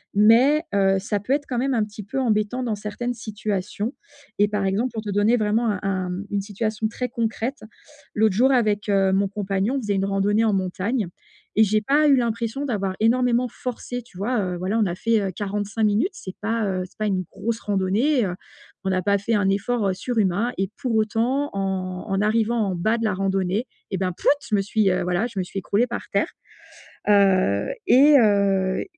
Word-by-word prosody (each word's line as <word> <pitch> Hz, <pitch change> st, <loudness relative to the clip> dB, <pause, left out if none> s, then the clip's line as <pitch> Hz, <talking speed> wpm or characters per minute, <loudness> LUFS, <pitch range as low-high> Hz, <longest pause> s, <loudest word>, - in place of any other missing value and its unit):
mais 245 Hz, +9 st, +5 dB
heu, 195 Hz, -1 st, +3 dB
ça 205 Hz, +1 st, -2 dB
peut 250 Hz, +7 st, -1 dB
être 290 Hz, 0 st, 0 dB
quand 245 Hz, -2 st, -2 dB
même 270 Hz, 0 st, 0 dB
un 220 Hz, -, +2 dB
petit 210 Hz, 0 st, -8 dB
peu 265 Hz, +7 st, -4 dB
embêtant 230 Hz, +1 st, 0 dB
dans 230 Hz, -3 st, -1 dB
certaines 210 Hz, +4 st, -4 dB
situations, 215 Hz, 0 st, -4 dB, 0.5 s
et 205 Hz, -, +5 dB
par 205 Hz, -1 st, -1 dB
exemple 210 Hz, +7 st, 0 dB
pour 220 Hz, -1 st, -4 dB
te 205 Hz, -, -4 dB
donner 210 Hz, +4 st, +3 dB
vraiment 220 Hz, +2 st, +1 dB
un 200 Hz, -3 st, -1 dB
un 185 Hz, -2 st, -1 dB, 0.2 s
une 200 Hz, -1 st, 0 dB
situation 215 Hz, +2 st, -2 dB
très 250 Hz, +3 st, -4 dB
concrète, 230 Hz, +2 st, -2 dB, 0.6 s
l'autre 215 Hz, -2 st, +3 dB
jour 260 Hz, +4 st, +4 dB
avec, 210 Hz, -4 st, +1 dB
heu, 195 Hz, -1 st, +3 dB
mon 195 Hz, +1 st, +2 dB
compagnon 200 Hz, +3 st, -1 dB
on 270 Hz, -, -1 dB
faisait 205 Hz, -2 st, -1 dB
une 195 Hz, 0 st, 0 dB
randonnée 200 Hz, +3 st, +1 dB
en 215 Hz, -, +2 dB
montagne 190 Hz, +3 st, -1 dB, 0.5 s
et 220 Hz, -, +7 dB
j'ai 215 Hz, +1 st, +2 dB
pas 295 Hz, +6 st, +3 dB
eu 275 Hz, -, +6 dB
l'impression 235 Hz, +3 st, -1 dB
d'avoir 200 Hz, -6 st, -2 dB
énormément 245 Hz, +2 st, +2 dB
forcé, 245 Hz, +1 st, -6 dB
tu 200 Hz, -6 st, -17 dB
vois? 230 Hz, +4 st, 0 dB
Heu, 180 Hz, -2 st, -3 dB
voilà, 190 Hz, +5 st, -1 dB
on 215 Hz, -, +3 dB
a 175 Hz, -, -1 dB
fait, 225 Hz, +1 st, +1 dB
heu, 190 Hz, -1 st, -2 dB
45 205 Hz, +2 st, -3 dB
minutes, 210 Hz, -, +2 dB
c'est 190 Hz, -, -9 dB
pas, 225 Hz, 0 st, 0 dB
heu, 185 Hz, -1 st, -1 dB
c'est -, -, -19 dB
pas 215 Hz, -, -1 dB
une 185 Hz, -2 st, 0 dB
grosse 225 Hz, +4 st, -3 dB
randonnée, 210 Hz, +7 st, +1 dB
heu, 180 Hz, -1 st, -3 dB, 0.5 s
on 190 Hz, -, +1 dB
a 185 Hz, 0 st, +1 dB
pas 200 Hz, +2 st, +2 dB
fait 215 Hz, +3 st, -1 dB
un 200 Hz, -2 st, +2 dB
effort, 205 Hz, +2 st, 0 dB
heu, -, -, 0 dB
surhumain, 215 Hz, +1 st, 0 dB
et 195 Hz, 0 st, -1 dB
pour 250 Hz, -5 st, -2 dB
autant 235 Hz, +6 st, +1 dB
en 190 Hz, -2 st, -3 dB
en 195 Hz, 0 st, 0 dB
arrivant 225 Hz, +2 st, +1 dB
en 195 Hz, -4 st, 0 dB
bas 220 Hz, +7 st, +1 dB
de 230 Hz, -, -2 dB
la 210 Hz, -, +1 dB
randonnée, 195 Hz, +4 st, -1 dB, 0.2 s
et 190 Hz, -, -1 dB
bah, 185 Hz, 0 st, -1 dB
pfuit! -, -, +2 dB, 0.2 s
Je -, -, -5 dB
me 200 Hz, -, +2 dB
suis, 205 Hz, 0 st, +1 dB
heu, 180 Hz, -, 0 dB
voilà, 180 Hz, +6 st, 0 dB
je 200 Hz, -5 st, -6 dB
me -, -, 0 dB
suis 195 Hz, -, -5 dB
écroulée 210 Hz, +6 st, +1 dB
par 240 Hz, -, -4 dB
terre. -, -, +1 dB, 0.8 s
Heu, 190 Hz, -, +3 dB, 0.2 s
et 285 Hz, +3 st, +7 dB
heu, 195 Hz, -3 st, +2 dB
210 Hz, 210 wpm, -23 LUFS, 195-235 Hz, 0.8 s, et